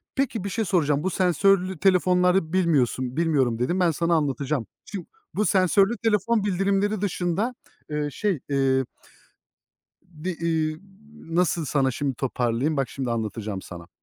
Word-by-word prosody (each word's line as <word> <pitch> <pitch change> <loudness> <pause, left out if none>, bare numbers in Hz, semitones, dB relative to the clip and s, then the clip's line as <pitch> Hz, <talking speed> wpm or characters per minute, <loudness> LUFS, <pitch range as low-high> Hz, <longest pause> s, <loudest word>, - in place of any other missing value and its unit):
peki, 245 -7 -1
bir 200 - -3
şey 225 +2 -1
soracağım. 150 -6 +1
Bu 190 - +1
sensörlü 185 +1 +2
telefonları 180 -2 +3
bilmiyorsun, 135 -7 +1
bilmiyorum 140 -8 +1
dedin. 155 +10 0
Ben 175 -2 +3
sana 170 +2 +1
anlatacağım. 140 -4 -1 0.2
Şimdi, 195 -4 -6 0.3
bu 210 - +1
sensörlü 195 +4 +3
telefon 220 0 +1
bildirimleri 200 +1 0
dışında, 200 +5 -1 0.4
ııı, 150 -1 -2
şey, 190 +2 -1
eee 135 -1 +2 1.2
Bir, 175 0 -7
iii, 160 -1 0 0.3
nasıl 170 -4 0
sana 135 -1 +1
şimdi 135 +1 -2
toparlayayım? 125 +3 -1
Bak, 135 -2 0
şimdi 130 -3 -4
anlatacağım 110 -3 -3
sana. 85 -1 -10
165 Hz, 135 wpm, -25 LUFS, 135-190 Hz, 1.2 s, telefonları